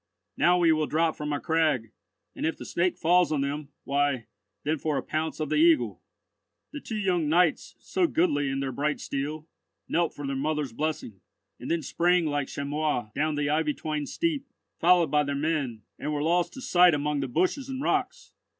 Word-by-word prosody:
Now 175 Hz, +1 st, +4 dB
we 170 Hz, -2 st, +4 dB
will 155 Hz, -1 st, +1 dB
drop 160 Hz, +1 st, +1 dB
from 150 Hz, 0 st, -4 dB
our 145 Hz, -, -1 dB
crag, 155 Hz, -9 st, +1 dB, 0.4 s
and -, -, -5 dB
if 160 Hz, -, 0 dB
the -, -, -8 dB
Snake 175 Hz, +1 st, 0 dB
falls 175 Hz, +1 st, +3 dB
on 150 Hz, -3 st, +1 dB
them, 140 Hz, +1 st, -3 dB
why, 140 Hz, -4 st, 0 dB, 0.4 s
then 155 Hz, +1 st, 0 dB
for 150 Hz, -1 st, -1 dB
a -, -, -2 dB
pounce 155 Hz, +1 st, -3 dB
of 155 Hz, -2 st, -2 dB
the -, -, +1 dB
Eagle." 330 Hz, 0 st, +3 dB, 0.7 s
The 290 Hz, -, -5 dB
two 225 Hz, -5 st, -5 dB
young 180 Hz, -6 st, +1 dB
knights, 170 Hz, 0 st, +2 dB
so 365 Hz, -2 st, 0 dB
goodly 145 Hz, -, +1 dB
in 135 Hz, 0 st, -2 dB
their 135 Hz, -1 st, -2 dB
bright 145 Hz, +3 st, -1 dB
steel, 150 Hz, +3 st, -4 dB, 0.4 s
knelt 170 Hz, -1 st, 0 dB
for 145 Hz, -, -6 dB
their 135 Hz, 0 st, -2 dB
mother's 145 Hz, -2 st, -2 dB
blessing, 145 Hz, -8 st, -3 dB, 0.4 s
and -, -, -7 dB
then 165 Hz, -2 st, 0 dB
sprang 175 Hz, +4 st, +2 dB
like 145 Hz, -2 st, -1 dB
chamois 140 Hz, -5 st, -2 dB
down 155 Hz, +1 st, 0 dB
the 145 Hz, 0 st, 0 dB
ivy 150 Hz, -1 st, +1 dB
twined 150 Hz, -3 st, -3 dB
steep, 300 Hz, -5 st, -1 dB, 0.3 s
followed 175 Hz, -3 st, +4 dB
by 150 Hz, 0 st, +4 dB
their 140 Hz, 0 st, -2 dB
men, 140 Hz, -7 st, -1 dB, 0.2 s
and 150 Hz, -, -3 dB
were 145 Hz, -1 st, -1 dB
lost 175 Hz, +2 st, +1 dB
to 265 Hz, -, -8 dB
sight 180 Hz, -7 st, +5 dB
among 145 Hz, 0 st, -1 dB
the 135 Hz, -, -2 dB
bushes 185 Hz, -, 0 dB
and 265 Hz, +1 st, -4 dB
rocks. -, -, -1 dB
155 Hz, 195 wpm, -27 LUFS, 145-175 Hz, 0.7 s, sight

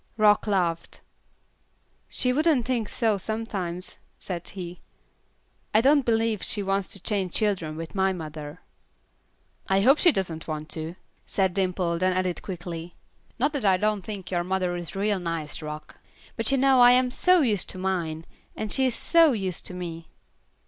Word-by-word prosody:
Rock 210 Hz, 0 st, +4 dB
laughed. 175 Hz, -5 st, -1 dB, 1.1 s
"She 250 Hz, 0 st, +1 dB
wouldn't 300 Hz, -4 st, +2 dB
think 240 Hz, -4 st, -1 dB
so 220 Hz, -4 st, +1 dB
sometimes," 190 Hz, -4 st, -4 dB, 0.2 s
said 175 Hz, -2 st, -5 dB
he. 180 Hz, -2 st, -7 dB, 1.0 s
"I 215 Hz, -, +7 dB
don't 280 Hz, +1 st, +4 dB
believe 225 Hz, -3 st, +1 dB
she 205 Hz, -, 0 dB
wants 195 Hz, 0 st, 0 dB
to 200 Hz, -, -7 dB
change 190 Hz, -2 st, -2 dB
children 185 Hz, -8 st, 0 dB
with 165 Hz, 0 st, -7 dB
my 190 Hz, -1 st, +2 dB
mother." 155 Hz, -4 st, -7 dB, 1.1 s
"I 195 Hz, 0 st, +3 dB
hope 270 Hz, +8 st, +5 dB
she 350 Hz, -, +6 dB
doesn't 170 Hz, -, -3 dB
want 155 Hz, -1 st, -5 dB
to," 160 Hz, +2 st, -4 dB, 0.3 s
said 190 Hz, -2 st, +1 dB
Dimple, 180 Hz, -3 st, 0 dB
then 185 Hz, +1 st, +2 dB
added 185 Hz, -1 st, -1 dB
quickly, 175 Hz, -2 st, -6 dB, 0.4 s
"Not 285 Hz, +5 st, +1 dB
that 280 Hz, -5 st, -2 dB
I 190 Hz, -2 st, +4 dB
don't 210 Hz, +1 st, 0 dB
think 190 Hz, -1 st, -7 dB
your 175 Hz, -1 st, 0 dB
mother 185 Hz, -1 st, -1 dB
is 175 Hz, -1 st, -6 dB
real 200 Hz, 0 st, 0 dB
nice, 165 Hz, -4 st, -4 dB
Rock, 150 Hz, 0 st, -8 dB, 0.4 s
but 225 Hz, +2 st, 0 dB
you 275 Hz, -, +3 dB
know 265 Hz, 0 st, +4 dB
I 245 Hz, 0 st, +8 dB
am 250 Hz, 0 st, +3 dB
so 360 Hz, +6 st, +4 dB
used 215 Hz, -9 st, +1 dB
to -, -, 0 dB
mine, 170 Hz, -4 st, -2 dB, 0.3 s
and 215 Hz, -2 st, -4 dB
she 265 Hz, -1 st, +4 dB
is 245 Hz, -, 0 dB
so 330 Hz, -4 st, +5 dB
used 190 Hz, -5 st, -3 dB
to 180 Hz, -, -8 dB
me." 170 Hz, -2 st, -7 dB
190 Hz, 170 wpm, -26 LUFS, 175-225 Hz, 1.1 s, I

